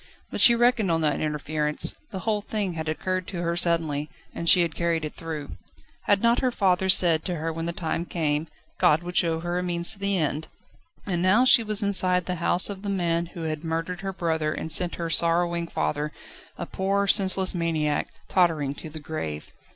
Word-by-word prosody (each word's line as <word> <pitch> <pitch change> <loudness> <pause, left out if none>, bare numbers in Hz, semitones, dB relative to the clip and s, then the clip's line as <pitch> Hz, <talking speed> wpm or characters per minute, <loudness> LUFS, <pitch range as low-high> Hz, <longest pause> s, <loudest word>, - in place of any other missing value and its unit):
But - - -1
she 235 - +8
reckoned 240 -4 +2
on 165 -1 +1
that 150 -2 0
interference: 150 0 0 0.2
the 190 -4 -6
whole 215 0 -1
thing 205 -3 -3
had 160 -1 -4
occurred 185 +3 -2
to 175 -3 -5
her 170 0 -1
suddenly, 160 -4 0 0.2
and 170 - -1
she 175 - +7
had 165 -2 -3
carried 170 -1 -1
it 150 - -6
through. 155 -3 -7 0.5
Had 200 +1 +2
not 235 +1 +3
her 255 -1 +1
father 190 -4 +1
said 170 -4 +3
to 180 - -2
her 160 0 -3
that - - -4
when 165 +1 -4
the - - -1
time 170 0 -3
came, 155 -2 -1 0.3
God 155 +3 +3
would 175 0 -7
show 165 -1 +1
her 175 +1 -2
a - - -1
means 175 0 +1
to 210 - -7
the 200 -1 0
end? 155 -1 -2 0.6
And 175 -4 -1
now 200 +8 +4
she 250 - +6
was 215 -1 0
inside 185 -3 +2
the 180 -2 -4
house 175 +1 +4
of 200 -2 -6
the 205 - -4
man 170 -3 0
who 170 0 -8
had 155 0 -4
murdered 165 +2 -3
her 195 0 -3
brother 160 -4 -1
and 160 - -5
sent 175 +2 +2
her 170 - -4
sorrowing 170 0 +1
father, 150 -2 -2 0.5
a 175 - -4
poor, 195 +3 -1
senseless 190 -2 +3
maniac, 160 -4 -1 0.2
tottering 160 -7 +1
to 155 - -9
the 155 +1 -9
grave. 80 - -6
170 Hz, 210 wpm, -25 LUFS, 160-190 Hz, 0.6 s, she